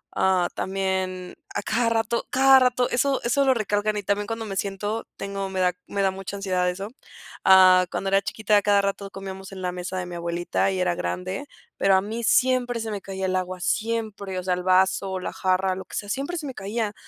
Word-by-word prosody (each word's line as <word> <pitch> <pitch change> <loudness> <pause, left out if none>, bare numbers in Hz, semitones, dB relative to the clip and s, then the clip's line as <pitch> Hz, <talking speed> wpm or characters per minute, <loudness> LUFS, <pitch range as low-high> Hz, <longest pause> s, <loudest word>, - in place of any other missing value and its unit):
ah, 185 -2 +3
también 190 -1 -2 0.2
a - - -1
cada 230 0 +1
rato 230 +1 0
cada 265 +1 +6
rato, 250 -1 +2
eso 270 +2 +2
eso 275 +4 +2
lo 265 - +5
recalcan 210 -1 0
y 205 - -3
también 205 +1 -1
cuando 225 0 -4
me 195 -2 -5
siento 205 +3 -3
tengo 195 0 -4
me 190 -1 -3
da 180 -1 +2
me 200 -1 -1
da 190 - +3
mucha 195 +1 -7
ansiedad 185 -2 0
eso. 195 +4 -5 0.5
Ah, 185 -1 +7
cuando 195 - -2
era 195 0 +3
chiquita 215 0 0
a 205 - +5
cada 200 0 +3
rato 200 0 -2
comíamos 195 0 -8
en 190 -1 -7
la 180 - -1
mesa 180 +1 -5
de 180 - -2
mi 175 - -8
abuelita 170 +2 -1
y 190 - -2
era 180 -1 +1
grande, 185 +9 -4 0.3
pero 195 -1 +4
a 190 - +4
mí 225 +3 -5
siempre 245 0 +2
se 220 -1 -4
me 200 -2 -4
caía 190 0 -4
el 185 0 0
agua, 185 0 -2
siempre, 215 -2 -2
o 180 - -3
sea, 185 - 0
el 180 - -2
vaso, 190 +1 +2
la - - -5
jarra, 185 0 +1
lo 190 - -7
que - - -10
sea, 205 - -4
siempre 280 +8 -2
se 310 - -5
me 265 - -5
caía. 210 +1 -3
195 Hz, 225 wpm, -24 LUFS, 185-220 Hz, 0.5 s, Ah